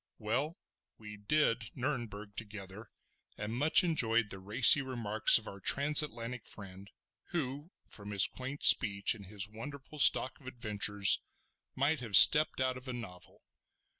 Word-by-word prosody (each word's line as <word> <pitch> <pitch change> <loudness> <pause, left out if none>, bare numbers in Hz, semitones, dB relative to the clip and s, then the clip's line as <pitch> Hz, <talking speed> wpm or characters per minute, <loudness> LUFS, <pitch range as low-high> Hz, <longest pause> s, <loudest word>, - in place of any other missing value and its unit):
Well, 130 +10 -4 0.4
we 105 -1 -13
"did" 115 +1 -1
Nurnberg 115 -7 -7
together, 105 -1 -11 0.5
and 105 +2 -7
much 150 +8 +2
enjoyed 115 -10 -1
the 95 - -5
racy 110 +8 +4
remarks 115 -5 0
of 110 - -9
our 100 - -11
Transatlantic 125 - +1
friend, 100 -1 -12 0.4
who, 145 -1 -6 0.2
from 100 -1 -10
his 100 -2 -1
quaint 130 +3 -9
speech 100 -1 +4
and 100 -4 -14
his 100 -1 -6
wonderful 140 +7 -12
stock 130 -1 +3
of 130 - -17
adventures, 105 -5 +2 0.5
might 145 +3 -2
have 115 -5 -4
stepped 155 -2 +6
out 130 -1 -3
of 130 +1 -12
a 130 - -6
novel. 100 -7 -11
115 Hz, 140 wpm, -30 LUFS, 105-135 Hz, 0.5 s, stepped